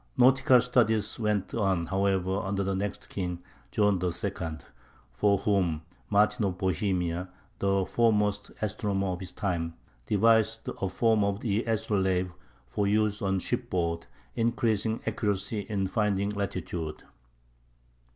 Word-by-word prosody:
Nautical 130 0 +6
studies 115 -4 +2
went 105 -3 0
on, 95 -6 +1
however, 95 0 +1
under 100 0 -1
the 95 0 -1
next 100 +1 -3
king, 90 -2 -4 0.3
John 105 -3 +2
II, 90 -2 -1 0.8
for 100 +12 +2
whom 95 -6 +1 0.3
Martin 105 +1 +3
of 95 -2 -1
Bohemia, 90 -1 -1 0.3
the 100 -1 +2
foremost 105 -3 +1
astronomer 100 -2 -1
of 90 -1 -3
his 95 - -6
time, 85 -5 -2 0.3
devised 110 +1 +3
a 95 - 0
form 110 0 +2
of 100 +2 -1
the 110 -1 0
astrolabe 95 -5 0 0.4
for 100 +12 -1
use 105 0 +1
on 95 -1 +1
shipboard, 85 -2 -2 0.3
increasing 115 -2 +1
accuracy 105 0 -1
in 100 -3 0
finding 100 0 0
latitude. 90 -5 -4
100 Hz, 120 wpm, -28 LUFS, 95-110 Hz, 0.8 s, Nautical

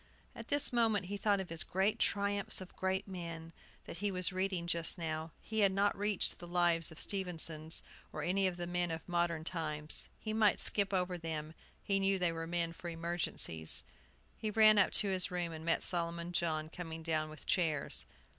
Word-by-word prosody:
At - - -9
this 285 -3 +2
moment 225 -5 +1
he 200 +3 -5
thought 200 0 +1
of 190 - -5
his 165 0 -3
"Great 190 +3 0
Triumphs 200 0 +6
of 185 -1 -11
Great 190 +2 -2
Men," 170 -3 -8 0.3
that - - -8
he 205 +1 -1
was 185 -1 -2
reading 185 -2 -2
just 170 +1 -1
now. 160 -1 -4
He 220 0 -5
had 200 -2 +4
not 200 +1 +1
reached 205 -1 0
the 175 - -10
lives 175 -2 +2
of 160 - -12
the - - +2
Stephensons, 165 -4 -2 0.3
or - - -5
any 190 +2 +1
of 180 -1 -4
the 175 - -4
men 175 0 -2
of 160 0 -6
modern 170 -2 -1
times. 155 -3 -2
He 215 - -5
might 215 -2 +3
skip 200 -2 +6
over 180 -1 -1
to - - -16
them, 160 -1 -4 0.3
he 195 -1 0
knew 195 0 +2
they 180 -2 0
were 165 0 -5
men 170 -1 -2
for 175 +1 -8
emergencies. 165 - 0 0.6
He 215 - -2
ran 215 0 +6
up 195 - +4
to 205 - +3
his 185 0 +1
room, 175 -2 -3
and 160 -1 -8
met 165 0 +1
Solomon 170 -1 0
John 155 -2 -1
coming 165 -1 -8
down 155 -1 -1
with 155 - -12
chairs. 160 -6 -1
175 Hz, 200 wpm, -33 LUFS, 165-195 Hz, 0.6 s, Triumphs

